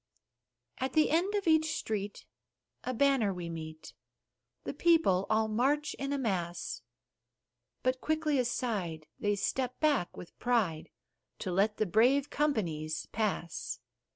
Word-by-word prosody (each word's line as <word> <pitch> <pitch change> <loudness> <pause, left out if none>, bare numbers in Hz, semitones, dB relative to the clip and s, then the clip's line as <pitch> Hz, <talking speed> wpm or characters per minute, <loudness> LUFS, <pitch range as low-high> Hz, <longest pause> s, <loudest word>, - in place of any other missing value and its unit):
At 260 +1 -1
the 310 -2 +4
end 360 +6 +2
of 405 -1 0
each 315 -1 +4
street, 205 -2 -4 0.6
a 255 - -2
banner 255 -4 +3
we 175 -2 -5
meet, 160 -1 -7 0.7
The - - -4
people 315 - +3
all 220 0 +3
march 275 +7 +1
in 275 0 -4
a 285 - +1
mass, 180 -9 -2 1.0
But 255 0 +1
quickly 310 -2 +1
aside, 210 -10 -1
they 205 0 +1
step 255 +5 -1
back 290 - +1
with 175 - -11
pride, 215 -11 +1 0.5
To 190 - -2
let 205 +4 +2
the 215 - +2
brave 250 +9 +3
companies 165 - -1
pass. 200 -6 -2
225 Hz, 130 wpm, -31 LUFS, 185-280 Hz, 1.0 s, the